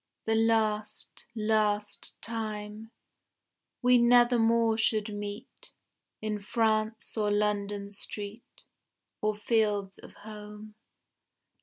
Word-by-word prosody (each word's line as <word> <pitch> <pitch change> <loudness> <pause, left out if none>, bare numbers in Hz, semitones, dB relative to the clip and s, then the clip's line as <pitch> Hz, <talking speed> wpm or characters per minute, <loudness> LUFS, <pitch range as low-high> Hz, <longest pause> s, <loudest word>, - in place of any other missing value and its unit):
The 225 - +1
last, 220 -1 0
last 210 -1 0
time. 215 -1 -5 0.9
We 250 0 +6
nevermore 235 -1 +4
should 215 -1 +1
meet 205 - -8 0.5
In 210 -1 -2
France 220 0 0
or 210 -2 +1
London 205 -1 0
street, 205 +2 -7 0.6
Or 215 0 +1
fields 210 -3 0
of - - -14
home. 210 0 -10
215 Hz, 90 wpm, -29 LUFS, 210-225 Hz, 0.9 s, We